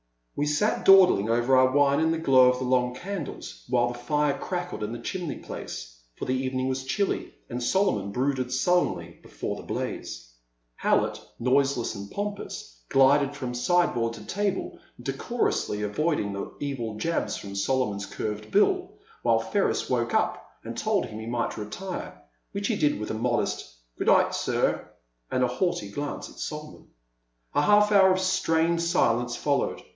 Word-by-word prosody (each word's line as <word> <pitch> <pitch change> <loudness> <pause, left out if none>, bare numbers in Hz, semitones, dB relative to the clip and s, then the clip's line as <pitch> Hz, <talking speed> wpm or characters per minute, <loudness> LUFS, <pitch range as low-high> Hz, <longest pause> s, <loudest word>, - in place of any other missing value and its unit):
We 145 - 0
sat 150 +9 +1
dawdling 185 - +7
over 120 +3 +3
our 130 0 +6
wine 140 0 +4
in 160 0 +2
the 165 - +1
glow 130 -5 +6
of 125 - +1
the 130 - -3
long 125 -1 +1
candles 155 - -6
while 120 -1 +2
the 120 0 -7
fire 150 +3 +1
crackled 180 - -4
in 105 +1 -3
the 120 - -4
chimney 180 +3 -4
place; - - -7 0.2
for - - -5
the 130 - 0
evening 130 0 -1
was 130 0 -2
chilly, 200 +9 -1
and 125 0 -4
Solomon 120 - +1
brooded 130 +1 -1
sullenly 175 +7 0
before - - -5
the - - -8
blaze. - - -5 0.4
How - - +3
lett, - - -4 0.2
noiseless 130 -1 +1
and 100 -1 -8
pompous, 200 - -6
glided 140 +1 +4
from 125 -3 -4
side 175 +8 +2
board 115 -1 -1
to 105 -2 -10
table, 200 0 -2 0.2
decorously 105 0 -1
avoiding 105 -1 0
the 100 - -5
evil 125 -6 -3
jabs 165 +10 -1
from 100 -1 -8
Solomon's 100 -1 0
curved 105 0 -5
bill, 365 - +2 0.3
until - - +1
Ferris - - +1
woke - - 0
up - - 0
and - - -6
told 215 -2 +1
him 110 -2 -8
he 110 - -7
might 120 0 -2
retire, 175 - -6 0.3
which 200 0 -2
he 230 - +1
did 150 - +1
with 105 - -4
a - - -2
modest 110 - -1 0.3
good - - -2
night, - - +5
sir,'* - - 0 0.4
and 130 - +1
a - - +4
haughty 125 - -1
glance 145 +7 -4
at - - -15
Solomon, 150 0 -7 0.7
A - - +3
half 210 +5 +5
hour 190 -2 +6
of 185 - +2
strained 170 -3 +1
silence 120 -8 +1
fol 145 +2 +1
lowed. - - -3
130 Hz, 170 wpm, -26 LUFS, 115-170 Hz, 0.7 s, dawdling